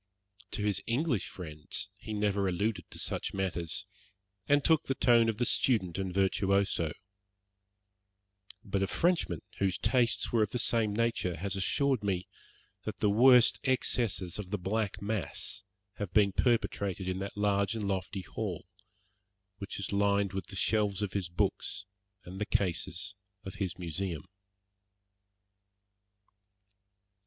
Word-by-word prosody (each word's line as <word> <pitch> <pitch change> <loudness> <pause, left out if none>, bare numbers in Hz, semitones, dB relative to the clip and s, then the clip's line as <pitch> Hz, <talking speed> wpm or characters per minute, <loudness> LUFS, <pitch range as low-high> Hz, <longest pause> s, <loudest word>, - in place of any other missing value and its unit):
To 105 - -2
his 100 -2 +1
English 120 - +1
friends 85 +4 -6
he 105 +2 -9
never 100 -2 +1
alluded 100 +4 -1
to - - -10
such - - -1
matters, 90 -2 -1 0.6
and 145 0 +4
took 160 -1 +4
the 135 - -1
tone 115 -3 +5
of 110 - -1
the 120 - +1
student 95 -9 +2
and 95 -1 -2
virtuoso; 95 -3 +1 1.7
but 100 0 -1
a 95 - +2
Frenchman 165 - +1 0.2
whose 95 -2 +1
tastes 115 +2 +2
were 115 - +3
of 105 - +2
the 125 - -2
same 115 -2 +2
nature 105 -6 0
has 100 +4 -3
assured 130 +5 +1
me 95 -2 -1 0.6
that - - -5
the 105 - +2
worst 125 +2 +6
excesses 115 -8 +1
of 100 -3 -5
the 105 - -1
black 100 +1 -2
mass 100 -7 -3 0.4
have 100 -4 -4
been 100 -2 +5
perpetrated 100 -5 0
in 95 0 -1
that 100 +1 -5
large 100 0 +2
and 105 -3 -2
lofty 95 0 -2
hall, - - -4 0.9
which 100 -1 -5
is 100 - -3
lined 100 -1 +2
with 95 -2 -4
the 100 - -8
shelves 105 0 +1
of 100 - -3
his 95 -4 -1
books, 100 +2 -1 0.4
and 95 +3 -8
the 105 - -1
cases 90 +1 -1 0.3
of 95 - -7
his 90 -3 -2
museum. 85 -1 -4
100 Hz, 140 wpm, -31 LUFS, 95-110 Hz, 1.7 s, worst